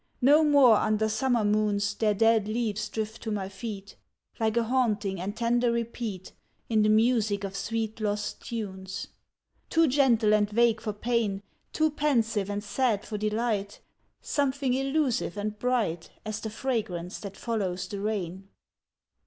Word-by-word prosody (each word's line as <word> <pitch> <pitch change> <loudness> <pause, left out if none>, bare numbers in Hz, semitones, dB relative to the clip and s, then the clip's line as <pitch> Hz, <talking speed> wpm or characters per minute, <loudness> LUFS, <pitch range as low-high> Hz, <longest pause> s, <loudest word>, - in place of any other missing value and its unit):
No 295 +4 +6
more 280 -7 +6
under 215 +1 +1
summer 230 +1 +1
moons 205 -1 +1
Their 210 0 +1
dead 225 0 +3
leaves 215 -1 -2
drift 220 0 -4
to 225 - -4
my 200 -3 -2
feet, 200 -1 -7 0.4
Like 220 0 +1
a 235 - +3
haunting 220 -6 0
and 205 +4 -4
tender 240 +1 +2
repeat 230 -5 -4 0.4
In 220 -2 +3
the 210 - +3
music 215 -2 +2
of 195 -1 -5
sweet 220 +2 -3
lost 210 -1 -2
tunes. 190 -5 -5 0.6
Too 330 0 +4
gentle 245 -6 +3
and 205 -1 +3
vague 230 0 +3
for 215 - -2
pain, 210 -2 -1 0.3
Too 315 0 +1
pensive 230 -9 +1
and 205 0 -3
sad 215 -1 0
for 210 -2 -5
delight, 215 -1 -1 0.4
Something 280 -2 0
elusive 270 - 0
and 210 +1 -3
bright 225 -10 0 0.2
As 215 0 -3
the 220 - -5
fragrance 210 -7 -3
that 200 -1 -8
follows 190 -6 -2
the 200 +1 -5
rain. 195 -3 -3
215 Hz, 150 wpm, -28 LUFS, 205-235 Hz, 0.6 s, No